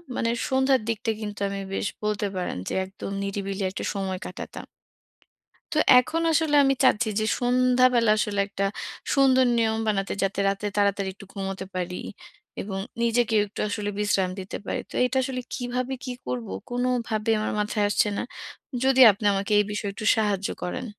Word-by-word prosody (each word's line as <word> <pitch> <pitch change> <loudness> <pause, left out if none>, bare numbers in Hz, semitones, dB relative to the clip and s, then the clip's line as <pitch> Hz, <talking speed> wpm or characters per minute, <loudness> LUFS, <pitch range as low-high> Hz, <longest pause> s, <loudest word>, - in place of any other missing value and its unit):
মানে 230 - 0 0.2
সন্ধ্যার 265 -1 +3
দিকটা 225 0 -1
কিন্তু 210 -1 -5
আমি 195 0 -4
বেশ - - -1 0.2
বলতে 210 -1 0
পারেন 180 - -3
যে - - -4
একদম 195 +1 -8
নিরিবিলি 195 0 -3
একটা - - -5
সময় 190 -2 -3
কাটাতাম। 180 - -8 1.1
তো - - +2 0.2
এখন 310 +6 0
আসলে 310 -1 +2
আমি 270 0 +3
চাচ্ছি 240 -3 +4
যে - - +1 0.2
সন্ধ্যাবেলা 250 -1 +4
আসলে 205 -1 0
একটা 200 -1 -2 0.5
সুন্দর 260 -2 +5
নিয়ম 220 -1 +2
বানাতে 200 -2 0
যাতে 195 0 0
রাতে 200 +1 -2
তাড়াতাড়ি 200 -1 +1
একটু 200 0 -13
ঘুমোতে 195 -1 -4
পারি 180 0 -3 0.7
এবং 195 -1 -4 0.2
নিজেকেও 230 -2 +3
একটু 205 - -8
আসলে 205 0 -3
একটু 205 - -8
বিশ্রাম 195 -3 +1
দিতে 185 - -6
পারি। - - -2
তো - - -13
এটা 250 +1 -1
আসলে 255 0 -3
কীভাবে 250 +1 -2
কি 255 - -4 0.2
করব? 125 -2 -3 0.2
কোনভাবেই 240 -3 0
আমার 215 - -1
মাথায় 210 0 0
আসছে 205 +1 +2
না। - - -1 0.6
যদি 265 0 +4
আপনি 205 +2 -4
আমাকে 200 +2 -1
এই 205 - +4
বিষয়ে 210 0 -3
একটু 215 - -7
সাহায্য 205 -3 0
করেন। 180 +8 -3
210 Hz, 170 wpm, -25 LUFS, 195-250 Hz, 1.1 s, সুন্দর